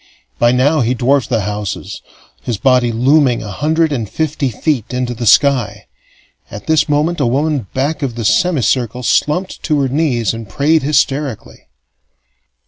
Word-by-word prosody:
By 120 0 +4
now 140 +5 +2
he 125 +2 0
dwarfed 130 +2 +1
the 115 -3 0
houses, 105 -1 -5 0.4
his 120 -4 -3
body 125 -1 +2
looming 130 +2 +2
a 105 - -7
hundred 160 - 0
and 115 -7 -3
fifty 150 -3 -2
feet 125 0 -2
into 125 -1 -2
the 120 0 -4
sky. 130 -5 +3 0.6
At 100 - -9
this 155 -1 +2
moment 155 +4 0
a 135 - +1
woman 140 -2 -1
back 140 +5 -1
of 130 -5 -3
the 115 -2 -4
semicircle 125 - +1
slumped 165 +9 0
to 150 -3 0
her 135 - 0
knees 125 -7 0
and 115 -2 -8
prayed 150 +9 +1
hysterically. 140 -3 -2
130 Hz, 155 wpm, -15 LUFS, 120-150 Hz, 0.6 s, By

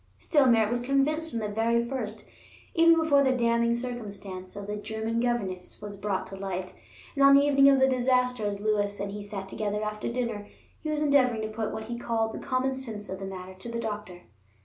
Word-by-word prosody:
Still, 290 -4 +3
Merritt 225 -3 +4
was 240 - +1
convinced 275 +5 +1
from 230 -5 -3
the 210 - -2
very 230 +3 +1
first, 220 -5 -4 0.5
even 335 0 +6
before 290 -3 +4
the 260 -1 +2
damning 235 0 +2
circumstance 205 -6 -6
of 200 0 -6
the 210 +1 -4
German 220 +2 -3
governess 220 -7 -2
was 205 -1 -7
brought 200 -1 -2
to 195 - -8
light; 190 -1 -4 0.4
and 280 - +2
on 275 0 +8
the 280 - +7
evening 275 -1 +5
of 275 -1 +5
the 265 - +5
disaster, 250 -2 +1
as 200 -1 -3
Lewis 205 -1 0
and 200 0 -3
he 205 +1 -6
sat 200 -1 -6
together 210 +1 -2
after 210 +1 -3
dinner, 230 -4 -3 0.3
he 310 - -4
was 305 0 0
endeavoring 255 -6 +3
to 215 - -3
put 220 -2 -2
what 220 - -5
he 235 +2 -5
called 225 -2 -1
the - - -5
common 260 +1 0
sense 225 -6 -6
of 190 - -5
the 195 - -5
matter 190 -1 -7
to 190 +5 -9
the 235 0 -3
doctor. 210 -5 -5
225 Hz, 215 wpm, -28 LUFS, 205-255 Hz, 0.5 s, on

